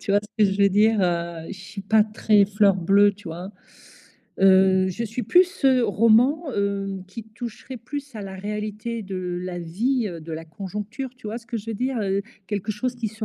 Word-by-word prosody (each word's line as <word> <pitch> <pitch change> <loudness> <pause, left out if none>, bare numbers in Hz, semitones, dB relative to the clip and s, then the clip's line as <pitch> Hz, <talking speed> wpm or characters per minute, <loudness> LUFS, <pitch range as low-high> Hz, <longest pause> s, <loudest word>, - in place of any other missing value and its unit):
tu 200 - -2
vois, 205 - +4
ce 210 - -13 0.2
que 200 - +3
je 200 +1 +1
veux 200 - +6
dire? 210 +2 +3
Heu, 170 -2 -2
je 200 - -7
suis 195 +1 -8
pas 215 +1 +4
très 210 -1 +3
fleur 200 -1 +3
bleue, 200 +3 +4
tu 205 -1 -16
vois? 175 +4 -6 0.9
Heu, 190 0 +5
je 185 +5 -4
suis 230 +3 -4
plus, 360 - +3
heu, 255 -2 +5
roman, 230 - +4
heu, 195 -1 -2
qui 225 +3 -8
toucherait 235 +3 -8
plus 285 +2 -7
à 210 - -5
la 195 -1 -7
réalité 210 +3 -4
de 185 -2 -4
la 180 -1 -4
vie, 220 +9 -1
heu, 170 -3 -7
de 165 - -10
la 160 +1 -5
conjoncture, 210 - -6
tu 235 - -11
vois, 225 - -4
ce 230 - -20
que 240 - -4
je 210 - -11
veux - - -3
dire? 255 +3 -1
Heu, 195 -1 0 0.3
quelque 205 0 -2
chose 245 +4 -3
qui 230 -2 -2
se 220 +1 -6
205 Hz, 220 wpm, -24 LUFS, 190-230 Hz, 0.9 s, veux